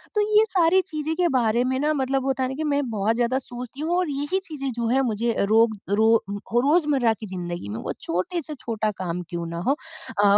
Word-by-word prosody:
तो 420 - +3 0.2
ये 435 - +6
सारी 365 0 +4
चीज़ें 315 -3 -3
के 360 0 +2
बारे 235 -1 +3
में 260 +1 0
ना 300 +2 +2
मतलब 270 -1 0
वो - - -3
होता 265 -1 0
है 255 - 0
ना 265 - -4
कि 310 - -3
मैं 285 -1 +1
बहुत 215 0 0
ज़्यादा 240 +2 +1
सोचती 250 +2 -8
हूँ 340 +3 +1
और 365 -3 +1
यही 290 +7 -1
चीज़ें 275 -6 -4
जो 235 -1 -2
हैं 260 +3 +3
मुझे 230 +2 0
रोग 220 +2 +4
रो 220 +3 +4 0.2
रोज़मर्रा 255 - +2
की 215 - -7
ज़िंदगी 175 - -5
में 105 - -4
वो - - -3
छोटे 185 - -2
से 305 0 -7
छोटा 220 -4 -1
काम 180 -1 -3
क्यों 170 -1 -4
ना 170 0 -5
हो 275 - +5
अ, 285 -8 -5
255 Hz, 230 wpm, -24 LUFS, 220-300 Hz, 0.2 s, ये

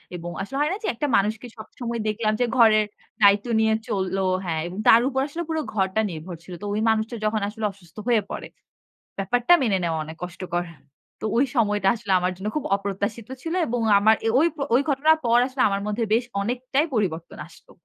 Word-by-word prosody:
এবং 175 0 -6
আসলে 270 +8 -5
হয় 300 - +2
না - - -3
যে, - - -2
একটা 295 +5 -1
মানুষকে 220 +4 -1
সবসময় 235 +2 -6
দেখলাম 215 0 0
যে, - - +4
ঘরের 215 -2 +6 0.4
দায়িত্ব 200 +3 +5
নিয়ে 220 0 +3
চলল 190 -1 -1 0.3
হ্যাঁ, 160 -2 -1
এবং 180 - -8
তার 230 +1 +8
উপর 265 -1 -1
আসলে 330 +4 -5
পুরো 320 -1 0
ঘরটা 190 +2 +1
নির্ভর 170 +2 -7
ছিল। 180 - -10
তো - - -6
ওই 210 - -1
মানুষটা 220 +2 0
যখন 215 0 0
আসলে 215 +1 -4
অসুস্থ 180 -3 -22
হয়ে 235 -3 +4
পড়ে। - - -5 0.7
ব্যাপারটা 245 - +3
মেনে 210 -6 +2
নেওয়া 165 -2 -1
অনেক 160 +1 -9
কষ্টকর। 175 0 -4 0.6
তো - - -3
ওই 260 - +4
সময়টা 210 -4 +2
আসলে 220 -3 -5
আমার 180 +1 0
জন্য 195 +3 -5
খুব 300 - -3
অপ্রত্যাশিত 200 +3 -4 0.2
ছিল 330 - -3
এবং 240 0 -1 0.2
আমার 220 +2 +5 0.2
ওই 325 - +4 0.3
ওই 260 - +5
ঘটনার 305 +3 +4
পর 235 0 +4
আসলে 260 0 -3
আমার 195 0 -1
মধ্যে 210 +3 -1
বেশ 235 +3 +3 0.2
অনেকটাই 255 +7 -1
পরিবর্তন 170 -6 -2
আসলো। 165 - -19
215 Hz, 195 wpm, -24 LUFS, 195-245 Hz, 0.7 s, তার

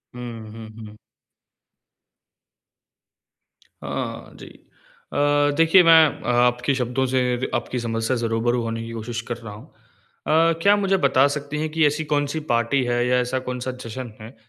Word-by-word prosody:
हुँ, 115 -3 -8
हुँ, 110 0 -10 0.2
हुँ। 105 0 -14 2.9
हाँ, - - -5
जी। - - -11 0.7
अ, 145 0 +2
देखिए, 165 +3 +6
मैं 160 -4 +5
आपके 120 +2 +2
शब्दों 125 +1 -1
से 130 - +3 0.2
र - - -1
आपकी 120 +1 -3
समस्या 115 +1 -2
से 115 -1 -1
रूबरू 120 +2 0
होने 115 0 -4
की 115 - -8
कोशिश 115 +1 -5
कर 120 - -3
रहा 115 -3 -10
हूँ। 105 - -12 0.6
अ, 165 +2 +4
क्या 200 +3 +5
आप 205 - +1
मुझे 195 -1 +1
बता 135 0 +4
सकती 145 0 -5
हैं 155 0 -2
कि 160 0 +2
ऐसी 150 +2 -2
कौन-सी 145 +1 -1
पार्टी 120 +3 +1
है 120 0 0
या 125 0 +2
ऐसा 125 +1 -1
कौन-सा 125 0 -4
जश्न 115 0 -7
है 115 +4 -11
125 Hz, 160 wpm, -22 LUFS, 115-145 Hz, 2.9 s, देखिए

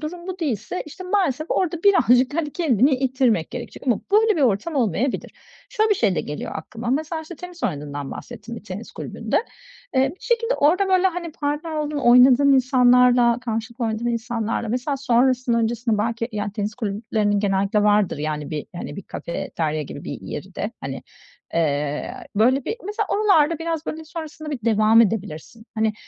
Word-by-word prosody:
durum 345 +3 -6
bu 370 -1 -5
değilse, 285 - -2
işte, 370 +5 -9
maalesef 350 -7 0
orada 345 -2 0
birazcık, 265 -9 +4
hani, 320 -3 -1
kendini 270 - +3
ittirmek 255 - +1
gerekecek - - -8
ama 240 -5 +2
böyle 430 -2 +4
bir 295 - +1
ortam 245 +7 +1
olmayabilir. 245 - 0 0.4
Şöyle 435 0 +1
bir - - +5
şey 215 - +1
de - - 0
geliyor 150 - -6
aklıma. 235 +2 -5
Mesela, 315 +4 -1
işte, 345 +2 -9
tenis 360 -1 -10
oynadığından 145 -3 -3
bahsettin, 235 -1 -8
bir - - -10
tenis 205 +3 -8
kulübünde. - - -2 0.5
Iıı, 265 +1 +4
bir 315 - -10
şekilde 475 0 0
orada, 360 +7 +3
böyle, 375 0 +4
hani, 345 -2 -4
partner 295 +2 -3
olduğun, 300 -1 -2
oynadığın 255 +2 +6
insanlarla, 250 -2 +4
karşılıklı 230 +1 -3
oynadığın 220 +1 -2
insanlarla, 230 -1 -2
mesela, 255 +4 -1
sonrasında 250 -1 +2
öncesinde 230 -1 0
belki, 230 +2 -1
yani, 205 -1 -3
tenis 210 0 -3
kulüplerinin 210 -2 -1
genellikle 200 +1 +1
vardır, 210 -6 +3
yani, 150 -1 -3
bir, 150 -2 -4
hani, - - -6
bir 200 - -7
kafeterya 155 -2 -3
gibi 145 - -8
bir - - -5
yeri - - -7
de. - - -3
Hani, - - -5 0.5
ııı, 150 -2 -1
böyle 250 +5 +3
bir, - - -2
mesela, 420 0 -2
oralarda 335 -7 +3
biraz, 330 -1 -3
böyle, 315 0 -5
sonrasında 310 -1 -7
bir 275 - -3
devam 220 0 +5
edebilirsin. 210 0 -3
Hani, 220 -1 +1
245 Hz, 170 wpm, -22 LUFS, 215-310 Hz, 0.5 s, oynadığın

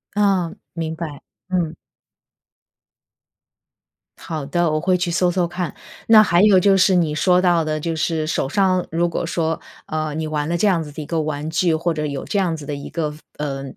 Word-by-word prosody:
嗯， 195 -5 +1 0.2
明 160 -1 -3
白， 155 -4 -6 0.3
嗯。 170 -3 -1 2.4
好 155 -4 -5
的， 175 +3 +1
我 155 - +1
会 180 +3 +2
去 180 0 -1
搜 175 +1 +2
搜 175 -1 +1
看。 175 -2 -4 0.3
那 220 -1 +8
还 175 -4 +3
有 200 -3 +6
就 195 +1 +4
是， 185 0 +4
你 160 -4 +1
说 180 +3 +3
到 175 -3 +3
的 155 0 -1
就 165 +1 -2
是 160 -1 -1
手 145 - 0
上 185 +2 +2
如 170 +1 +1
果 170 - -2
说， 165 -1 -1 0.3
呃， 155 -1 -2
你 160 +1 -3
玩 150 -1 -2
了 170 - 0
这 210 - +2
样 175 -5 +2
子 150 - -9
的 150 - -7
一 - - -6
个 165 +1 -1
玩 150 0 -3
具， 165 0 +1
或 165 +2 0
者 150 -1 -2
有 140 -2 -4
这 205 - -2
样 180 -4 +1
子 155 -2 -8
的 145 - -3
一 140 - -8
个， 155 -3 -2 0.2
呃， 140 -2 -3
165 Hz, 220 characters per minute, -21 LUFS, 155-180 Hz, 2.4 s, 那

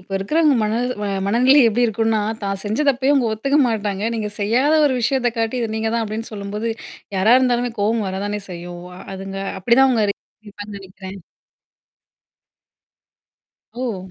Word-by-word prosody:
இப்ப 185 +2 -23
இருக்கிறவங்க 300 +9 +2
மன 215 0 0 0.5
மனநிலை 255 +7 +5
எப்படி 240 +3 +1
இருக்கும்னா, 225 0 +1 0.2
தான் 195 -1 -2
செஞ்ச 215 +5 -2
தப்பையும் 270 +2 +3
அவங்க 245 -5 +2
ஒத்துக்க 275 +7 +1
மாட்டாங்க. 205 -3 -2
நீங்க 215 -2 -2
செய்யாத 245 +9 +2
ஒரு 260 - +1
விஷயத்தை 245 0 +1
காட்டி 225 +2 0
இதை 230 - -1
நீங்க 220 0 -1
தான் 230 -1 0
அப்படின்னு 220 +2 -5
சொல்லும்போது, 210 +2 -4 0.5
யாரா 215 +6 +5
இருந்தாலுமே 245 -2 +1
கோவம் 215 +1 +1
வரதானே 205 +2 -3
செய்யும். 175 0 -8
ஓ - - -11 0.2
அதுங்க 195 0 -6 0.2
அப்படிதான் 235 +8 +4
அவங்க 225 -4 +2 0.4
இருப்பாங்க 205 0 -9
நெனைக்கிறேன். 190 0 -10 2.6
ஓ. 195 -7 -4
220 Hz, 145 wpm, -20 LUFS, 200-245 Hz, 2.6 s, மனநிலை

